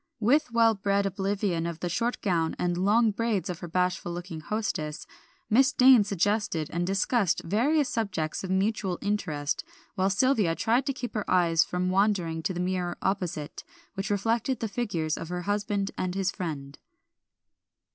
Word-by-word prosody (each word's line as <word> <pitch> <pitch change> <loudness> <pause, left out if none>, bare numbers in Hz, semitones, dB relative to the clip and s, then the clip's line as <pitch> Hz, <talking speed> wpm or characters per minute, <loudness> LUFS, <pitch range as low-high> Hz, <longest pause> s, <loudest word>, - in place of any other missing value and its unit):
With 265 +6 +3
well 230 -1 +4
bred 200 0 0
oblivion 195 -3 -1
of 170 -1 -5
the 175 - -2
short 230 +8 -1
gown 165 -5 +1
and 175 0 0
long 210 +5 +3
braids 210 -3 -1
of 170 - -7
her 175 - -6
bashful 180 0 -1
looking 175 -1 -6
hostess, 160 -5 -3 0.4
Miss 260 +5 +4
Dane 255 -3 +7
suggested 200 -4 -1
and 175 +1 -1
discussed 195 +1 +1
various 265 - +2
subjects 185 -9 -2
of 190 - -5
mutual 190 -1 0
interest, 155 -8 -1 0.3
while 190 +1 +1
Sylvia 205 -4 +2
tried 240 - +1
to 275 - +1
keep 250 -2 -6
her 215 -2 -3
eyes 170 -2 +4
from 180 +1 -2
wandering 185 -5 +1
to 185 - -2
the - - -3
mirror 180 -1 -1
opposite, 180 -6 -2 0.3
which 195 0 -4
reflected 225 +5 0
the 225 - -2
figures 185 -9 -2
of 165 - -6
her 180 0 -3
husband 205 0 -1
and 185 0 -2
his 195 0 0
friend. 145 -7 -6
195 Hz, 165 wpm, -27 LUFS, 175-215 Hz, 0.4 s, Dane